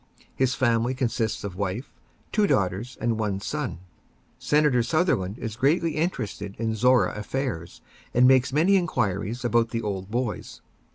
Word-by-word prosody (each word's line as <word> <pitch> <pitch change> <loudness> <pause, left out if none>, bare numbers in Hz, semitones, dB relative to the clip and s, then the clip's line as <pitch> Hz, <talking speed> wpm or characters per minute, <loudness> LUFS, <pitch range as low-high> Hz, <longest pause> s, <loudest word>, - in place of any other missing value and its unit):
His 130 -1 +1
family 120 0 +1
consists 115 -4 -1
of 100 -3 -5
wife, 100 +6 -4 0.4
two 210 -1 +3
daughters, 100 - 0
and 115 -1 0
one 100 -3 -1
son. 145 +4 -3 0.6
Senator 145 -4 +3
Sutherland 115 - 0
is 110 -3 -5
greatly 155 +7 +2
interested 105 - -3
in 115 0 -1
Zorra 125 +3 +3
affairs, 105 -6 -4 0.3
and 125 +1 +5
makes 130 0 +4
many 170 +8 +4
inquiries 115 - -1
about 120 -1 +2
the 115 -1 -3
old 95 -2 -4
boys. 120 -3 -3
120 Hz, 145 wpm, -25 LUFS, 105-130 Hz, 0.6 s, and